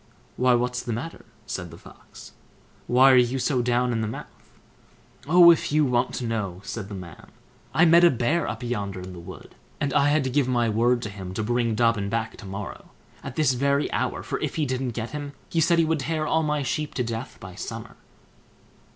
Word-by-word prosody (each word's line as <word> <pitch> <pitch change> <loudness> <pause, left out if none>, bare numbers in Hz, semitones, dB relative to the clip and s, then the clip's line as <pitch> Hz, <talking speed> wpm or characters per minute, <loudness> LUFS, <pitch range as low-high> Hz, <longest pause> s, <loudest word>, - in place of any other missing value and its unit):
"Why, 125 0 +3
what's 125 0 -1
the 120 - -4
matter?" 145 +9 -6 0.2
said 90 -4 -5
the - - -12
Fox; - - -14 0.6
"why 130 +2 +6
are - - +6
you 125 +1 +3
so 130 0 +1
down 125 +1 +1
in 115 - -1
the 110 - -1
mouth?" 110 - -10 0.7
"Oh, 170 +2 +8
if 165 - 0
you 150 0 +3
want 125 -1 0
to 125 - -3
know", 105 -6 -3
said 105 -2 -6
the 100 - -6
man; 90 -4 -10 0.4
"I 160 +5 +4
met 170 +1 +6
a 175 - +8
Bear 135 +6 0
up 115 +3 -5
yonder 100 -6 -3
in 90 0 -8
the 90 - -9
wood, 85 - -11 0.3
and 140 -2 -1
I 140 - +4
had 150 0 +2
to 130 - -2
give 140 0 +2
my 120 -2 +1
word 120 +3 +2
to 105 - -4
him 95 -2 -8
to 110 - -1
bring 120 0 0
Dobbin 115 -3 +1
back 115 +1 -2
to 100 - -10
morrow, 100 +1 -7 0.3
at - - -7
this 150 -4 +3
very 140 +3 +1
hour; - - -2
for - - -3
if - - -3
he 155 - 0
didn't 130 -3 -2
get 115 0 -4
him, 145 -1 -6 0.2
he 165 - +2
said 170 +2 +3
he 165 - +4
would 160 -1 0
tear 155 +2 -2
all 160 +1 +2
my 150 -2 0
sheep 150 +4 -3
to 125 - 0
death 120 +2 -5
by 95 0 -10
summer." - - -7
125 Hz, 220 wpm, -25 LUFS, 110-145 Hz, 0.7 s, Oh